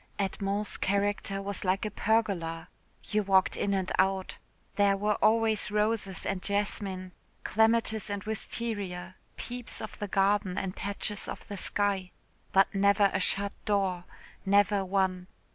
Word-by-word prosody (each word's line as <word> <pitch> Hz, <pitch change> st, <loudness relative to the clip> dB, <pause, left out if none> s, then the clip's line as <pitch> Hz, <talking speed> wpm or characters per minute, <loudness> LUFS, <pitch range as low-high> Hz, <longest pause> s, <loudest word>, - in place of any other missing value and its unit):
Edmond's 200 Hz, +1 st, -1 dB
character 200 Hz, 0 st, 0 dB
was 200 Hz, 0 st, -3 dB
like 190 Hz, +2 st, +1 dB
a 215 Hz, -, -3 dB
pergola. 180 Hz, -7 st, 0 dB, 0.3 s
You 215 Hz, -, 0 dB
walked 190 Hz, -2 st, +3 dB
in 200 Hz, -, -1 dB
and 190 Hz, -1 st, -1 dB
out. 190 Hz, 0 st, +1 dB, 0.4 s
There 200 Hz, -1 st, +3 dB
were 210 Hz, +1 st, +1 dB
always 220 Hz, -1 st, +3 dB
roses 210 Hz, -2 st, -1 dB
and 195 Hz, -1 st, -2 dB
jasmine, 195 Hz, -2 st, -1 dB, 0.3 s
clematis 220 Hz, 0 st, +2 dB
and 200 Hz, -1 st, -3 dB
wisteria, 200 Hz, -4 st, -4 dB, 0.2 s
peeps 245 Hz, -1 st, -5 dB
of 215 Hz, -, -7 dB
the 205 Hz, -, -3 dB
garden 195 Hz, -1 st, +1 dB
and 190 Hz, -2 st, -3 dB
patches 200 Hz, +1 st, -3 dB
of -, -, -7 dB
the 205 Hz, -, -6 dB
sky 195 Hz, -2 st, 0 dB, 0.4 s
but 195 Hz, 0 st, +4 dB
never 200 Hz, 0 st, +4 dB
a -, -, +1 dB
shut 200 Hz, +2 st, 0 dB
door 190 Hz, -4 st, 0 dB, 0.4 s
never 200 Hz, 0 st, +3 dB
one. 185 Hz, -1 st, 0 dB
200 Hz, 140 wpm, -29 LUFS, 190-210 Hz, 0.4 s, but